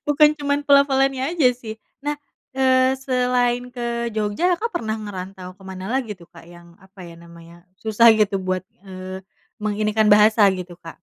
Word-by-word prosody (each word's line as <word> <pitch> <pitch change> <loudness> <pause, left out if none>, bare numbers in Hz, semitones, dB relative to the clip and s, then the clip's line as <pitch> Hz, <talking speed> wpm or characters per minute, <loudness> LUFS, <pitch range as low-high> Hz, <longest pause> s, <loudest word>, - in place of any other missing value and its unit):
Bukan 295 +1 +5
cuman 285 0 -1
pelafalannya 275 +1 +2
aja, 275 -7 +4
sih. 225 -3 -8 0.3
Nah, 295 - 0 0.4
eee, 260 0 +3
selain 250 -1 0
ke 235 -1 -3
Jogja, 215 - 0
Kakak 455 +7 -4
pernah 220 -5 -3
ngerantau 190 -3 -8
ke 195 - -17
mana 190 +1 -7
lagi, 250 -4 -2
tuh, 175 -3 -19
Kak, 165 -1 -15
yang 175 0 -16
apa, 190 0 -16
ya, 170 -1 -12
namanya, 170 +1 -16 0.2
susah, 225 +1 +5
gitu, 210 -2 +1
buat, 185 0 -2 0.2
eee, 185 0 -8 0.3
menginikan 215 +1 0
bahasa, 210 0 +5
gitu, 180 -1 -8
Kak? 165 -2 -12
215 Hz, 160 wpm, -21 LUFS, 185-260 Hz, 0.4 s, Bukan